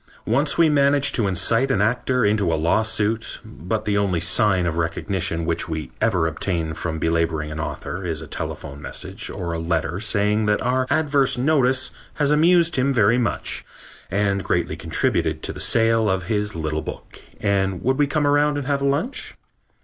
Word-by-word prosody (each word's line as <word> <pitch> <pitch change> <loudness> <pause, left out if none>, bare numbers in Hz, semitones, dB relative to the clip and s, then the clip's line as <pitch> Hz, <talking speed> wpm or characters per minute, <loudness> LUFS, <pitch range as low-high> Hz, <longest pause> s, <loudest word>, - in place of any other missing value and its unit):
Once 140 +6 +1
we 165 -1 +5
managed 140 -1 +3
to 110 -4 +1
incite 115 +7 +2
an 135 - +1
actor 125 +3 +1
into 105 -4 +2
a - - +2
lawsuit, 110 +6 0
but 105 +7 -4
the 105 - 0
only 95 -4 0
sign 90 +1 +2
of 85 -2 -1
recognition 85 0 -2
which 80 0 -1
we 80 -1 -4
ever 95 -8 +2
obtain 80 -1 -2
from 80 +1 -4
belaboring 80 -1 0
an 75 - -6
author 85 +4 -5
is 80 -3 -3
a 80 - -7
telephone 70 -1 -6
message - - -5
or 85 -2 -4
a 85 - -3
letter 80 +1 -1
saying 105 0 +1
that 105 - +2
our 130 +1 +1
adverse 145 -5 +2
notice 130 -1 +2 0.2
has 145 -1 +2
amused 170 +2 +4
him 135 +2 +2
very 115 -1 +3
much 120 - -2 0.5
and 100 0 0
greatly 85 -1 -1
contributed - - -1
to - - -3
the - - -9
sale 115 -1 +3
of 95 -1 0
his 105 0 -1
little 80 -1 -2
book - - -9 0.2
and 95 -3 0
would 130 +3 +1
we 145 - +4
come 150 +1 0
around 145 0 +3
and 145 - -3
have 140 0 0
lunch. 140 - -1
105 Hz, 180 wpm, -22 LUFS, 85-130 Hz, 0.5 s, we